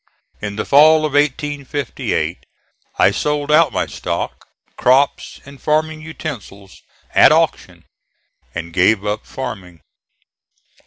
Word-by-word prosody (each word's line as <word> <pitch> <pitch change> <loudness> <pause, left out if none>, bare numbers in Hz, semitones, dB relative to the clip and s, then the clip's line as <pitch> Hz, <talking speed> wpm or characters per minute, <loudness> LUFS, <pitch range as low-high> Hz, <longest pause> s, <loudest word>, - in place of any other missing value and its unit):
In 105 -1 -5
the 110 - -3
fall 155 +2 +5
of 150 - -3
1858 145 -1 -2 0.5
I - - +4
sold 150 0 -1
out 155 -2 +5
my - - -1
stock, - - -5 0.3
crops 135 +3 +1
and 140 0 -14
farming 155 +1 0
utensils 125 -11 -9 0.3
at - - +7
auction, - - 0 0.7
and 85 0 -6
gave 95 +3 +2
up 105 +1 -3
farming. 90 - -7
140 Hz, 110 wpm, -18 LUFS, 105-150 Hz, 0.7 s, at